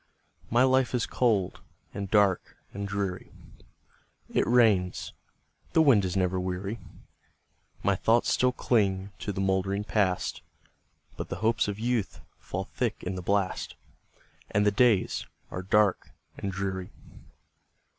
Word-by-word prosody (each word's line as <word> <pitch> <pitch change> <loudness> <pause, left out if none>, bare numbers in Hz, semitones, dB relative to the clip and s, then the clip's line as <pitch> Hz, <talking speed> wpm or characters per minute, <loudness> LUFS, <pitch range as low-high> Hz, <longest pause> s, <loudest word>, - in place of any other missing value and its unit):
My 120 +2 +4
life 130 -1 +3
is 120 - +1
cold, 105 -7 +1 0.3
and 100 -1 -4
dark, 100 -3 +2 0.2
and 100 +1 -4
dreary; 100 -2 -3 1.0
It - - +2
rains, 110 -7 +3 0.5
and - - -31
the 160 - +5
wind 115 -10 +5
is 90 0 -2
never 95 0 +1
weary; 95 +4 -3 1.0
My - - +3
thoughts 115 +1 +2
still 125 0 +3
cling 100 -6 0
to 105 - -3
the 95 - -5
mouldering 95 +1 0
Past, 100 -4 0 0.8
But - - -5
the - - -3
hopes 115 -1 +2
of 100 -1 -3
youth 115 -2 -1 0.2
fall - - -4
thick - - -3
in 90 - -3
the 90 - -4
blast, 100 +1 -1 0.7
And 105 0 +2
the 105 - +4
days 110 -2 +2 0.2
are 90 - -4
dark 100 +1 +2 0.3
and 100 - -4
dreary. 95 -1 -3
100 Hz, 135 wpm, -28 LUFS, 95-115 Hz, 1.0 s, the